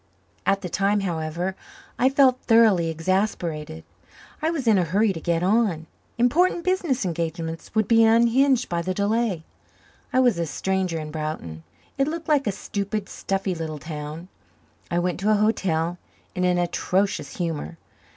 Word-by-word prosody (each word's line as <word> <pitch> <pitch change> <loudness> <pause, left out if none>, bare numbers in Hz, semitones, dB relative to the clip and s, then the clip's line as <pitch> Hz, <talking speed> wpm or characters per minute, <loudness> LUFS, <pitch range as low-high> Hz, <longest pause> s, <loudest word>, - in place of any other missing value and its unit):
At 195 0 +2
the 180 - -4
time, 200 +3 +1
however, 175 +1 -2 0.4
I 260 - +5
felt 265 -2 +4
thoroughly 220 -8 +4
exasperated. 165 -2 -2 0.6
I 315 - +1
was 315 -6 -2
in 215 -4 +5
a - - +2
hurry 200 +5 +2
to 165 - -6
get 170 0 0
on. 195 -5 +2 0.3
Important 335 +9 +2
business 345 - 0
engagements 165 0 -4
would 220 -2 +2
be 225 0 +5
unhinged 235 +3 +4
by 170 -1 -1
the 185 +2 -3
delay. 205 -3 0 0.7
I 255 - +2
was 245 -8 +3
a 170 - -1
stranger 185 0 -1
in 155 -1 -6
Broughton. 155 - -5 0.4
It 275 - +3
looked 330 +1 -4
like 290 -5 +2
a - - +2
stupid, 200 +1 -4
stuffy 195 -1 -2
little 160 -2 -5
town. 150 +2 -7 0.6
I 170 - -1
went 175 0 -1
to 205 +3 0
a 215 - +5
hotel 180 -5 0 0.3
in 180 -1 0
an 180 -1 +2
atrocious 185 +3 -1
humor. 155 - -3
190 Hz, 160 wpm, -24 LUFS, 165-225 Hz, 0.7 s, I